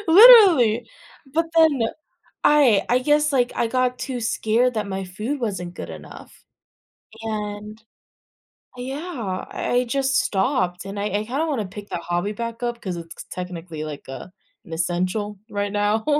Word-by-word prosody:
literally. 330 - +8 0.4
But 330 +2 +1
then, 320 -5 +5 0.6
I 270 -9 +5
I 245 +1 +4
guess, 295 +3 +2
like, 250 -2 +2
I 235 - +1
got 250 +1 0
too 260 -2 -4
scared 230 +2 +1
that 210 -2 -2
my 195 0 -3
food 210 +10 -4
wasn't 190 -7 -3
good - - -7
enough - - -11 0.9
and, 210 0 -5 1.0
yeah, 255 - -4
I - - -4
I 245 +1 +3
just 270 +2 +1
stopped, 190 -3 0
and 200 +1 -6
I 200 - -1
I 210 +1 -1
kind 260 +7 -2
of 325 - 0
want 275 -7 -1
to 205 - -4
pick 205 +2 -10
that 170 - -4
hobby 175 +4 -2
back 230 +2 -5
up 240 -1 -2
'cause 185 -3 -4
it's 165 -1 -9
c - - -31
technically 170 -3 -6
like 150 -2 -7
a 135 +6 -8 0.3
an 165 - -9
essential 180 +5 -1
right 205 0 -2
now. 210 +1 0
215 Hz, 165 wpm, -23 LUFS, 190-255 Hz, 1.0 s, literally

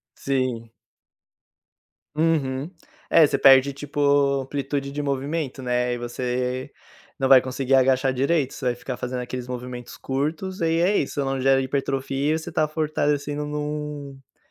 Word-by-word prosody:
Sim. 130 -4 -2 1.4
Uhum. 150 -2 0 0.4
É 160 - +7
você 140 -1 0
perde 135 +1 +6
tipo 145 +1 -6 0.4
amplitude 140 +1 -3
de 145 +1 -3
movimento, 140 0 -2
né, 125 0 0
e - - -3
você 125 +2 -3 0.5
não 135 -1 0
vai 130 -2 +9
conseguir 130 +1 -2
agachar 130 0 +3
direito, 140 +1 +1
você 130 - -7
vai 120 -1 +1
ficar 125 +1 -6
fazendo 125 0 -3
aqueles 125 0 -6
movimentos 125 -1 -7
curtos 155 +8 -3
e 165 0 +1
é 195 +4 +3
isso, 140 0 -1
não 135 0 -2
gera 135 0 +4
hipertrofia 135 +2 -1
e - - 0
você 165 +1 -7
tá 155 -1 +1
fortalecido 150 -1 -1
num-num 150 -2 -6
135 Hz, 145 wpm, -24 LUFS, 130-150 Hz, 1.4 s, vai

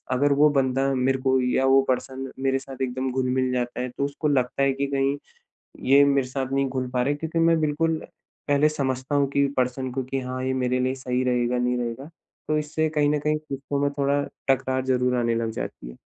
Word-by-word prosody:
अगर 140 +3 +3
वो 150 +2 +5
बंदा 135 +1 +2
मेरे 130 +1 +1
को 130 -1 +3
या 125 +1 +1
वो 135 0 +5
पर्सन 130 +1 -2
मेरे 135 0 +1
साथ 135 0 -8
एकदम 130 +1 -2
घुल-मिल 130 0 0
जाता 120 -1 -2
है 125 - -2
तो 140 - +1
उसको 145 +2 -2
लगता 130 -1 +1
है 135 0 +3
कि 140 +1 -2
कहीं, 140 0 0 0.7
ये 140 +1 +8
मेरे 140 -2 +2
साथ 130 0 -3
नहीं 135 0 +1
घुल 130 -1 -3
पा 125 - +2
रहे 145 +3 +1
क्योंकि 160 +2 -3
मैं 165 -1 +4
बिल्कुल 160 +2 +1 0.5
पहले 145 +1 +4
समझता 135 -2 -2
हूँ 140 -1 +3
कि 140 0 +2
पर्सन 130 +1 -1
को, 135 0 -2
कि 135 +1 -3
हाँ 130 0 -4
ये 130 - 0
मेरे 125 0 +1
लिए 130 +1 0
सही 130 -1 -2
रहेगा, 125 0 +1
नहीं 125 0 +1
रहेगा? 120 +6 -4 0.4
तो 155 - +2
इससे 155 +1 -1
कहीं 150 -1 +2
न 150 - +1
कहीं 150 +1 +1
रिश्तों 140 -2 -4
में 145 0 +2
थोड़ा 140 +1 +2 0.3
टकरार 130 0 +1
ज़रूर 125 -1 +1
आने 115 -1 +1
लग 115 -1 -1
जाती - - -6
है। - - -13
135 Hz, 220 wpm, -24 LUFS, 125-140 Hz, 0.7 s, ये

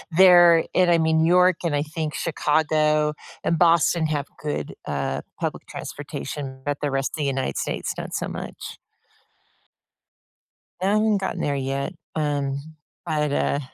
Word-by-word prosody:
there 175 -3 +7
and 180 -1 +4
I 170 - +5
mean, 160 0 +3
New - - +3
York 180 0 +5
and 155 - +1
I 145 - +1
think 155 0 -4
Chicago 155 -1 +1 0.3
and 165 - +1
Boston 170 -1 +4
have 145 -2 -2
good, 150 -1 -4
uh, - - -2 0.2
public - - -3
transportation, 130 - -6
but 145 0 -1
the 145 - -1
rest 135 0 -1
of 150 - -1
United 135 - -1
States, - - -2
not - - -6
so - - -2
much. - - -7 2.0
Haven't 210 +2 +2
gotten 190 -1 -3
there 145 -1 0
yet, 135 +5 -2 0.2
um, 145 -3 -1 0.5
but, 150 -3 0
uh 140 - +1
155 Hz, 145 wpm, -23 LUFS, 145-170 Hz, 2.0 s, there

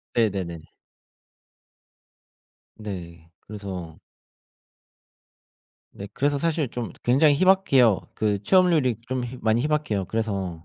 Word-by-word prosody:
네네네. 95 -8 -1 2.1
네. 85 -6 -8
그래서 95 -6 -8 1.9
네. 100 - -8
그래서 145 +1 0
사실 155 -4 -1
좀 120 -2 -5
굉장히 140 +4 +4
희박해요. 140 - +4 0.2
그 105 -2 0
취업률이 160 - +3
좀 130 -1 -2
희 125 +1 -8
많이 110 +2 +2
희박해요. 150 -10 -1
그래서 95 -6 -3
115 Hz, 210 characters per minute, -24 LUFS, 95-140 Hz, 2.1 s, 굉장히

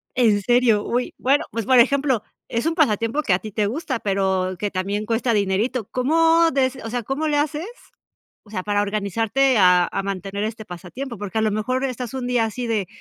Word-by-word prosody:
¿En 220 -5 +3
serio? 235 -1 +3
Uy, 245 +1 -1
bueno, 275 +3 +2
pues, 230 -2 -3
por 260 +1 +5
ejemplo, 265 -2 +3 0.2
es 235 +4 -2
un 325 0 0
pasatiempo 230 - +1
que 210 - +1
a 180 - +2
ti 215 - -8
te 210 0 0
gusta, 260 +1 -3
pero 190 -2 0
que 205 +2 -3
también 200 +3 -2
cuesta 230 +2 0
dinerito. 210 +3 0
¿Cómo 325 +5 +3
des, 260 -1 +1
o 225 - -5
sea, 245 +1 -3
cómo 275 +7 -2
le 295 -1 +1
haces, 300 +4 -1 0.8
o 210 - -20
sea, 185 -4 -3
para 205 0 0
organizarte 220 +6 +1
a 180 -2 +5
a - - -2
mantener 195 +1 -4
este 220 0 -5
pasatiempo? 205 +9 -7
Porque 205 +2 -4
a - - +2
lo 215 - +2
mejor 255 +6 -1
estás 250 -2 -4
un 260 -2 -3
día 245 -2 +2
así 240 +3 -4
de 215 -4 -1
225 Hz, 210 wpm, -22 LUFS, 205-260 Hz, 0.8 s, por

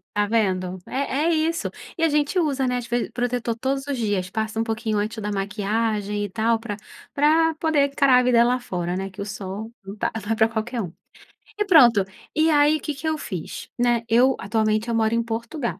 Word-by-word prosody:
Tá 205 - +2
vendo? 190 -4 0
É 270 0 -2
é - - +3
isso. 325 +1 0 0.3
E 330 - -1
a 325 - +4
gente 295 +5 +1
usa, 280 -5 0
né, 250 - 0
as 245 -1 -5
ve 240 0 -1
protetor 245 -1 -1
todos 270 +3 -2
os 280 - -2
dias, 205 -5 -1
passa 220 +2 -3
um - - +2
pouquinho 220 -1 -2
antes 215 +2 -2
da 210 0 -3
maquiagem 205 +1 -1
e 205 - -6
tal 225 +3 +1
pra 225 -3 -5 0.4
pra 320 +3 +3
poder 310 -3 +2
encarar 275 -2 +4
a 250 - +2
vida 240 -1 +5
lá 250 +1 +2
fora, 180 -5 -3
né, 195 +1 -3
que 195 +2 -9
o - - -3
sol 205 +2 -6
não 195 +2 -7
tá - - -1
não 220 - -3
é - - +2
pra 220 0 +4
qualquer 230 +2 -3
um. 175 - -5 0.7
E 420 - +2
pronto, 245 - +6 0.3
e 315 +1 +3
aí, 300 +1 +4
que 300 - -4
que 310 +3 -6
eu 315 -1 0
fiz? 185 - -6
Né. 240 -1 +2
Eu, 250 +3 +4
atualmente 215 +2 0
eu 230 - 0
moro 220 0 +2
em 235 0 +1
Portugal. 235 +3 -4
230 Hz, 220 wpm, -23 LUFS, 210-275 Hz, 0.7 s, pronto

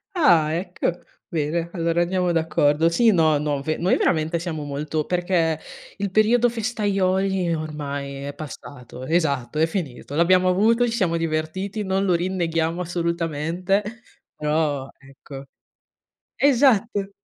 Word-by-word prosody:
Ah 165 - +4
ecco. 180 +2 -2 0.4
Bene, 165 +1 -1
allora 170 -1 0
andiamo 180 0 0
d'accordo, 160 -1 +2
sì 225 +7 +4
no, 160 -5 +3
no 145 -1 -1
ve 155 +2 -2
noi 180 +3 +2
veramente 160 0 +1
siamo 165 -3 -4
molto 145 +2 -3
perché 175 -3 0 0.4
il 200 0 -2
periodo 220 +5 +3
festaioli 195 -5 0
ormai 145 -3 -5
è 140 0 -5
passato 135 -4 -9
esatto, 150 -4 0
è 160 - +4
finito. 150 -6 -5
L'abbiamo 180 +3 +4
avuto, 225 +6 +3
ci - - -2
siamo 185 -8 0
divertiti, 165 +6 -2
non 190 0 0
lo 180 -3 +3
rinneghiamo 170 -1 -1
assolutamente, 170 +2 -1 0.5
però 150 -3 -1
ecco 135 0 -12 0.9
esatto. 235 -7 +3
170 Hz, 125 wpm, -23 LUFS, 155-190 Hz, 0.9 s, Ah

